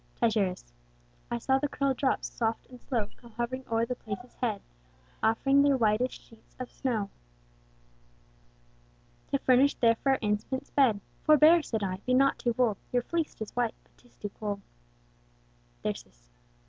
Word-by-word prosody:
Tityrus. 200 - 0 0.6
I - - -1
saw 265 - +2
the 290 - 0
curl'd 275 -1 0
drops, 270 -2 +1
soft 225 -1 -1
and 250 -1 -14
slow 230 -6 -1
Come 235 -2 -16
hovering 245 +3 -3
o'er 225 0 +2
the 250 - -2
place's 240 +1 -7
head, 220 -5 -1 0.6
Offring 270 +5 +4
their 280 -1 +4
whitest 225 +2 +1
sheets 225 -1 -21
of 255 - -6
snow, 225 -7 -2 2.2
To 275 - +1
furnish 265 +1 +4
the 230 -1 +4
fair 270 -1 +3
infant's 210 +5 -2
bed. 235 -8 +3 0.2
Forbear 310 +2 +7
(said 220 -8 -3
I) 185 -1 -2
be 250 +6 0
not 275 +1 +3
too 240 - +1
bold, 230 -5 +2
Your 245 -1 +1
fleect 325 -6 -2
is 215 - -10
white, 240 -2 0
but - - -32
'tis 245 - -25
too 205 - -5
cold. 205 0 -4 1.2
Thyrsis. - - -6
240 Hz, 155 wpm, -29 LUFS, 215-265 Hz, 2.2 s, Forbear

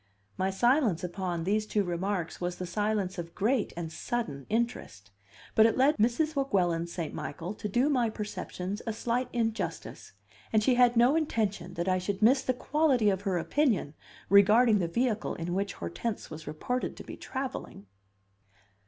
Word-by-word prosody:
My 190 +1 0
silence 240 - +2
upon 180 -2 -3
these 210 +4 0
two 210 -1 +1
remarks 180 0 -3
was 175 0 -2
the 180 - -5
silence 200 0 -1
of 170 0 -7
great 220 +3 +1
and 165 -2 -4
sudden 155 - -4
interest; 205 - -2 0.4
but 220 0 +6
it 225 - 0
led 275 +4 +4
Mrs. 245 +8 +1
Weguelin 180 -11 +1
St. 170 -2 -5
Michael 170 +6 -5
to 210 - -5
do 245 +7 +2
my 250 -6 +2
perceptions 205 -2 -5
a 225 - 0
slight 240 +3 -1
injustice, 225 -2 -3 0.4
and 215 -1 +3
she 255 - +4
had 245 -1 +4
no 245 +5 +5
intention 205 - -1
that 170 +2 -2
I 185 0 +2
should 195 +2 -3
miss 260 +4 +6
the - - 0
quality 255 -4 +2
of 190 0 -2
her 195 -3 0
opinion 215 - +1 0.3
regarding 210 +3 +6
the 175 - 0
vehicle 230 +4 -1
in 170 +1 -4
which 200 +2 -1
Hortense 125 - -5
was 155 0 -8
reported 245 +12 -3
to - - -8
be - - -8
travelling. 260 - -6
210 Hz, 170 wpm, -29 LUFS, 180-240 Hz, 0.4 s, but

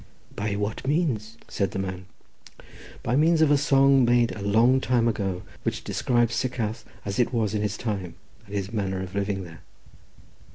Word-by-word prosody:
"By 100 0 -2
what 105 +5 -3
means?" 125 -8 0
said 100 -1 -1
the - - -6
man. 95 -1 -4 1.0
"By 120 - 0
means 160 +3 +4
of 150 - +4
a - - +6
song 135 -1 +4
made 120 -1 +3
a 105 - -7
long 115 +6 +4
time 120 -3 +2
ago, 95 -5 -2 0.2
which - - -3
describes 120 -2 +1
Sycharth 115 -2 -2 0.2
as 100 +2 -3
it 120 - +2
was 110 -4 0
in 105 - 0
his 105 -1 -2
time, 95 -7 -4 0.3
and 100 - -7
his 100 +1 -3
manner 95 -3 -2
of 95 0 -8
living 100 -1 -1
there." 85 -1 -12
110 Hz, 175 wpm, -25 LUFS, 100-125 Hz, 1.0 s, a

